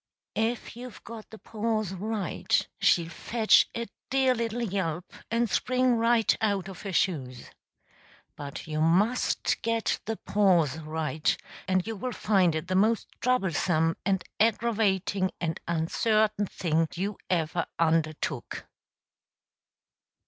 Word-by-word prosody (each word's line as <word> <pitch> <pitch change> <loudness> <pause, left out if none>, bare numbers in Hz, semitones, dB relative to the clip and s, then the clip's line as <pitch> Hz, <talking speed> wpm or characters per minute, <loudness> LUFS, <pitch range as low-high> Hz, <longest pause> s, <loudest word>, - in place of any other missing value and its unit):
If 225 +1 -2
you've 245 -1 -10
got 225 -1 -9
the 220 - -11
pause 215 -3 -2
right, 205 -1 -1
she'll 170 -1 +3
fetch 225 +3 +3
a 235 - -2 0.2
dear 265 -1 +3
little 235 0 -2
yelp 180 -5 -3 0.2
and 235 +1 +1
spring 255 +2 +2
right 230 0 +3
out 200 -4 0
of 190 -3 -9
her 200 - -5
shoes. 135 -10 -1 0.8
But 140 -1 -7
you 155 -1 -2
must 195 +10 +2
get 230 -1 0
the 225 0 -3
pause 175 -8 +2
right; 155 -1 -1 0.3
and 185 -1 +1
you 225 0 -4
will 250 +5 -4
find 185 -6 +2
it 160 +2 -3
the 185 - -2
most 215 +4 +2
troublesome 175 -8 +1
and 190 -2 +1 0.2
aggravating 205 -4 +1
and 165 -2 -2
uncertain 210 +5 +1
thing 165 -2 0
you 195 +3 -3
ever 170 -1 0
undertook. 155 -5 -1
195 Hz, 125 wpm, -28 LUFS, 165-225 Hz, 0.8 s, she'll